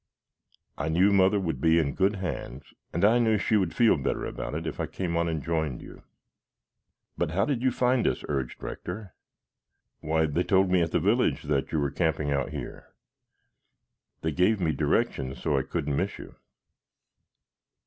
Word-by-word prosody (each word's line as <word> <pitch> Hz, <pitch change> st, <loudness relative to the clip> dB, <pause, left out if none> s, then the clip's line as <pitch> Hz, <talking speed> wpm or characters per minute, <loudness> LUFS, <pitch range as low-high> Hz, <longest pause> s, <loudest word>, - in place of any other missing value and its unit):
I 80 Hz, +2 st, -1 dB
knew 95 Hz, +5 st, +4 dB
Mother 100 Hz, +1 st, +4 dB
would 80 Hz, -8 st, -3 dB
be 80 Hz, 0 st, +4 dB
in 75 Hz, -4 st, +1 dB
good 100 Hz, +2 st, +2 dB
hands 75 Hz, -8 st, -6 dB, 0.2 s
and 85 Hz, +4 st, +1 dB
I 115 Hz, +3 st, +5 dB
knew 110 Hz, -2 st, +3 dB
she 110 Hz, -, +1 dB
would 95 Hz, -5 st, +1 dB
feel 115 Hz, -2 st, +4 dB
better 70 Hz, -, -2 dB
about -, -, -5 dB
it -, -, -4 dB
if -, -, -5 dB
I -, -, -1 dB
came 90 Hz, -3 st, -3 dB
on 85 Hz, 0 st, +1 dB
and 80 Hz, -4 st, -3 dB
joined 80 Hz, -6 st, -2 dB
you." -, -, -12 dB, 1.2 s
"But 85 Hz, -, +1 dB
how 90 Hz, +5 st, +1 dB
did 140 Hz, -5 st, -1 dB
you 130 Hz, -, +3 dB
find 125 Hz, 0 st, +1 dB
us?" -, -, -1 dB
urged 65 Hz, -4 st, -3 dB
Rector. 95 Hz, +1 st, -6 dB, 0.9 s
"Why, 80 Hz, +1 st, +1 dB
they 80 Hz, +3 st, 0 dB
told 95 Hz, 0 st, +2 dB
me, 90 Hz, -1 st, +4 dB
at 85 Hz, -, 0 dB
the -, -, +2 dB
village, -, -, +1 dB
that 70 Hz, -2 st, -1 dB
you 80 Hz, -, 0 dB
were 70 Hz, -2 st, 0 dB
camping 80 Hz, -4 st, 0 dB
out 70 Hz, -1 st, 0 dB
here. -, -, -8 dB, 1.3 s
They 80 Hz, -, -1 dB
gave 90 Hz, +7 st, +2 dB
me 85 Hz, -4 st, +1 dB
directions 65 Hz, -2 st, -1 dB
so 75 Hz, -, 0 dB
I 70 Hz, -, +2 dB
couldn't 70 Hz, +2 st, -2 dB
miss -, -, -1 dB
you." -, -, -11 dB
85 Hz, 180 wpm, -27 LUFS, 75-100 Hz, 1.3 s, I